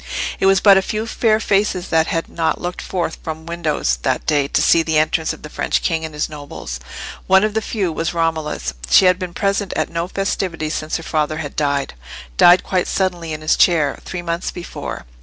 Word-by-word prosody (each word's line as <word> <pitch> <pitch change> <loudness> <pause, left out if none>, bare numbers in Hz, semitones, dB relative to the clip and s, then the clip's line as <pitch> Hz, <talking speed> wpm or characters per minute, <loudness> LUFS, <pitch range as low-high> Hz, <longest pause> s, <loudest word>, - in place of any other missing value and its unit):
It 190 - +3
was 195 0 +5
but 195 -1 +7
a - - 0
few 215 +3 -3
fair 225 -1 +2
faces 195 -3 0
that 160 -1 +3
had 165 - -1
not 165 -1 -1
looked 175 0 -4
forth 170 -3 -3
from 160 0 -6
windows 155 - -1
that - - -1
day 145 -2 +2
to - - +1
see 165 - +5
the 160 -1 0
entrance 155 +1 +1
of - - -9
the - - -6
French - - -1
king 165 -1 0
and 160 -1 -6
his 150 - -1
nobles. 145 - -7 0.5
One 190 +1 +5
of 215 -1 0
the 220 - 0
few 200 -6 -2
was 165 +1 -2
Romola's. 160 - -1 0.2
She - - +6
had 180 0 +4
been 180 -2 -5
present 200 0 0
at - - -1
no 170 +1 -2
festivities 185 -5 -2
since 155 0 -2
her 165 - -9
father 155 -1 -1
had 145 -3 -6
died—died 140 - +2
quite 185 -2 0
suddenly 175 -4 -1
in 155 0 -5
his 155 - +2
chair, 155 -6 +3
three 175 -1 -5
months 170 +1 -2
before. 175 - -7
165 Hz, 210 wpm, -19 LUFS, 155-185 Hz, 0.5 s, but